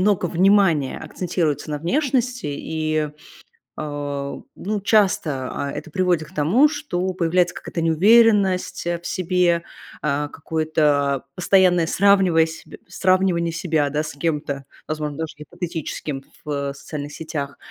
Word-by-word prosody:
много 195 Hz, -2 st, +2 dB
внимания 175 Hz, -5 st, +3 dB
акцентируется 165 Hz, -5 st, -2 dB
на 150 Hz, -, -2 dB
внешности. 250 Hz, -, 0 dB
И, 155 Hz, +1 st, -2 dB, 0.7 s
э, 145 Hz, -2 st, -4 dB
ну, 205 Hz, +1 st, -3 dB
часто, 185 Hz, -, +2 dB
а, 140 Hz, -, -3 dB
это 160 Hz, -, -7 dB
приводит 180 Hz, -2 st, +1 dB
к -, -, -18 dB
тому, 190 Hz, -, +4 dB
что 240 Hz, -12 st, -3 dB
появляется 175 Hz, 0 st, +1 dB
какая-то 165 Hz, -, -5 dB
неуверенность 195 Hz, +3 st, +4 dB, 0.2 s
в -, -, -6 dB
себе, 180 Hz, -1 st, +1 dB, 0.4 s
а, 145 Hz, 0 st, 0 dB
какое-то 150 Hz, -3 st, 0 dB
постоянное 180 Hz, -2 st, +4 dB
сравниваясь 180 Hz, -5 st, +3 dB, 0.3 s
сравнивание 185 Hz, -2 st, +2 dB
себя, 160 Hz, -4 st, 0 dB
да, 150 Hz, +2 st, -1 dB
с 155 Hz, -, -5 dB
кем-то, 145 Hz, -3 st, -2 dB, 0.2 s
возможно, 150 Hz, -1 st, -4 dB
даже 160 Hz, -1 st, -4 dB
гипотетическим 155 Hz, -3 st, -5 dB, 0.2 s
в 140 Hz, -2 st, -3 dB
социальных 145 Hz, +1 st, -7 dB
сетях. 145 Hz, -3 st, -5 dB
165 Hz, 120 wpm, -22 LUFS, 150-185 Hz, 0.7 s, тому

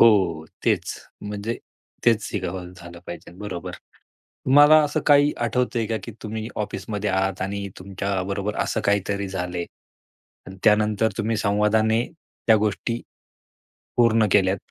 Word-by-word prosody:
हो. 95 Hz, -8 st, +5 dB, 0.2 s
तेच, -, -, +1 dB, 0.3 s
म्हणजे 105 Hz, +3 st, -4 dB, 0.5 s
तेच 115 Hz, -2 st, +4 dB
शिकावं 90 Hz, -2 st, -4 dB
झालं 85 Hz, -1 st, -11 dB
पाहिजे 85 Hz, -, -8 dB
बरोबर, 95 Hz, -5 st, -5 dB, 0.7 s
तुम्हाला 145 Hz, +3 st, +7 dB
असं 145 Hz, 0 st, 0 dB
काही 145 Hz, 0 st, +6 dB
आठवतंय 120 Hz, -1 st, 0 dB
का 110 Hz, -, -1 dB
की 115 Hz, -, -6 dB
तुम्ही 110 Hz, 0 st, -4 dB, 0.2 s
ऑफिसमध्ये 105 Hz, +1 st, -3 dB
आहात 95 Hz, 0 st, 0 dB
आणि 100 Hz, +1 st, -3 dB
तुमच्या 95 Hz, 0 st, -2 dB
बरोबर 100 Hz, +2 st, -3 dB
असं 110 Hz, -, -1 dB
काहीतरी 100 Hz, -1 st, 0 dB
झालंय 90 Hz, -2 st, -3 dB, 0.8 s
आणि 95 Hz, 0 st, -9 dB
त्यानंतर 105 Hz, +1 st, +3 dB
तुम्ही 115 Hz, -1 st, 0 dB
संवादाने 110 Hz, +3 st, +2 dB, 0.4 s
त्या 110 Hz, -, +7 dB
गोष्टी 110 Hz, +3 st, -1 dB, 1.0 s
पूर्ण 115 Hz, -2 st, +4 dB
केल्यात? 95 Hz, -1 st, +2 dB
105 Hz, 125 wpm, -24 LUFS, 95-110 Hz, 1.0 s, तुम्हाला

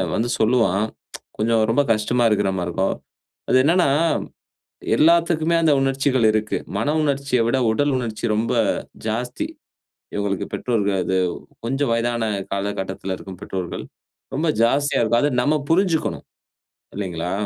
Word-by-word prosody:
வந்து 115 Hz, +2 st, 0 dB
சொல்லுவான். 110 Hz, -3 st, +2 dB, 0.5 s
கொஞ்சம் 110 Hz, +1 st, +2 dB
ரொம்ப 130 Hz, +5 st, +3 dB
கஷ்டமா 120 Hz, +3 st, 0 dB
இருக்கிற 100 Hz, -2 st, +1 dB
மாரி 90 Hz, -1 st, -2 dB
இருக்கும். 95 Hz, +3 st, 0 dB, 0.6 s
அது -, -, +3 dB
என்னன்னா, 170 Hz, +2 st, +3 dB, 1.1 s
எல்லாத்துக்குமே 170 Hz, 0 st, +3 dB
அந்த 155 Hz, -, +4 dB
உணர்ச்சிகள் 135 Hz, -2 st, +1 dB
இருக்கு. 110 Hz, 0 st, -1 dB, 0.2 s
மன 145 Hz, +8 st, 0 dB
உணர்ச்சிய 140 Hz, -3 st, 0 dB
விட 120 Hz, +3 st, +2 dB
உடல் 145 Hz, +4 st, +1 dB
உணர்ச்சி 115 Hz, -3 st, -5 dB
ரொம்ப 115 Hz, +3 st, 0 dB, 0.5 s
ஜாஸ்தி. 120 Hz, +3 st, -2 dB, 0.7 s
இவங்களுக்கு 100 Hz, -2 st, -2 dB
பெற்றோர்கள் 100 Hz, -5 st, 0 dB
அது 95 Hz, +1 st, 0 dB, 0.5 s
கொஞ்சம் 135 Hz, +2 st, 0 dB
வயதான 120 Hz, 0 st, 0 dB, 0.3 s
காலகட்டத்தில 95 Hz, -1 st, -3 dB
இருக்கும் 95 Hz, -2 st, -10 dB
பெற்றோர்கள் 95 Hz, -4 st, -5 dB, 0.5 s
ரொம்ப 160 Hz, +2 st, 0 dB
ஜாஸ்தியா 140 Hz, +5 st, +2 dB
இருக்கும். 120 Hz, +1 st, +2 dB
அத 145 Hz, -, +2 dB
நம்ம 150 Hz, +4 st, +2 dB, 0.2 s
புரிஞ்சுக்கணும். 170 Hz, -2 st, +1 dB, 0.7 s
இல்லைங்களா? 90 Hz, -3 st, -3 dB
115 Hz, 125 wpm, -22 LUFS, 100-140 Hz, 1.1 s, அந்த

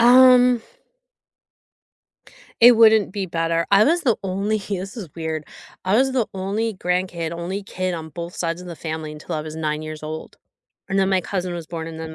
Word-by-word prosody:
Um 250 Hz, 0 st, +7 dB, 2.0 s
it 240 Hz, +1 st, +9 dB
wouldn't 220 Hz, -4 st, +6 dB
be 200 Hz, -1 st, -3 dB
better. 165 Hz, -1 st, 0 dB
I 200 Hz, +2 st, +7 dB
was 340 Hz, +4 st, +2 dB
the 240 Hz, -8 st, +2 dB
only 195 Hz, +3 st, -1 dB
h 195 Hz, -, -9 dB
this 195 Hz, +3 st, -4 dB
is 185 Hz, -8 st, -7 dB
weird. 160 Hz, -2 st, -4 dB, 0.4 s
I 190 Hz, +3 st, +2 dB
was 265 Hz, +2 st, +3 dB
the 250 Hz, -4 st, +1 dB
only 205 Hz, +4 st, -2 dB
grandkid, 180 Hz, -2 st, -2 dB
only 175 Hz, +4 st, -4 dB
kid 185 Hz, -1 st, -3 dB
on 160 Hz, -1 st, -6 dB
both 170 Hz, +3 st, -7 dB
sides 170 Hz, +1 st, -2 dB
of 180 Hz, -, -10 dB
the 170 Hz, -, -7 dB
family 155 Hz, -1 st, -5 dB
until 150 Hz, +1 st, -6 dB
I 155 Hz, -, -2 dB
was 155 Hz, 0 st, -7 dB
9 155 Hz, -1 st, -2 dB
years 155 Hz, 0 st, -7 dB
old, 155 Hz, +1 st, -7 dB, 0.5 s
and 195 Hz, 0 st, 0 dB
then 190 Hz, 0 st, +3 dB
my 190 Hz, -1 st, +2 dB
cousin 180 Hz, -1 st, -3 dB
was 170 Hz, -2 st, -6 dB
born 165 Hz, 0 st, -5 dB
and 160 Hz, -1 st, -8 dB
then 160 Hz, 0 st, -7 dB
180 Hz, 200 wpm, -22 LUFS, 160-210 Hz, 2.0 s, it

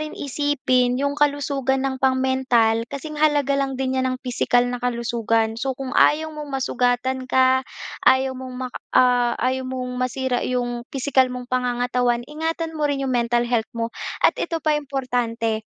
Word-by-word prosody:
rin 310 Hz, 0 st, -5 dB
isipin 260 Hz, -3 st, +1 dB
'yong 280 Hz, +1 st, 0 dB
kalusugan 280 Hz, -2 st, 0 dB
ng 265 Hz, -1 st, -2 dB
pang-mental, 260 Hz, -4 st, +2 dB
kasing 300 Hz, +2 st, -6 dB
halaga 290 Hz, -2 st, +3 dB
lang 270 Hz, -1 st, -2 dB
din 260 Hz, 0 st, -1 dB
niyan 260 Hz, 0 st, 0 dB
ng -, -, -23 dB
pisikal 245 Hz, 0 st, +2 dB
na 245 Hz, 0 st, -3 dB
kalusugan. 235 Hz, -2 st, 0 dB
So, 265 Hz, -1 st, -2 dB
kung 265 Hz, -1 st, -5 dB
ayaw 315 Hz, +1 st, +3 dB
mong 300 Hz, -1 st, -7 dB
masugatan 255 Hz, -1 st, -1 dB
ka, 260 Hz, 0 st, +4 dB, 0.5 s
ayaw 260 Hz, 0 st, +3 dB
mong 255 Hz, 0 st, -8 dB
mak 255 Hz, 0 st, -5 dB, 0.2 s
ah, 245 Hz, -1 st, +4 dB
ayaw 255 Hz, +1 st, -1 dB
mong 250 Hz, -1 st, -4 dB
masira 255 Hz, 0 st, -1 dB
'yong 245 Hz, -1 st, -2 dB
pisikal 265 Hz, -1 st, +2 dB
mong 250 Hz, 0 st, -6 dB
pangangatawan, 245 Hz, -1 st, 0 dB
ingatan 320 Hz, +3 st, -3 dB
mo 300 Hz, -2 st, -1 dB
rin 275 Hz, -1 st, -1 dB
'yong 260 Hz, -, -1 dB
mental 240 Hz, 0 st, +1 dB
health 235 Hz, -2 st, 0 dB
mo. 230 Hz, 0 st, -2 dB, 0.3 s
At -, -, +6 dB
ito 330 Hz, -1 st, -3 dB
pa 310 Hz, -, +3 dB
importante, 245 Hz, -5 st, -2 dB
255 Hz, 165 wpm, -22 LUFS, 245-275 Hz, 0.5 s, At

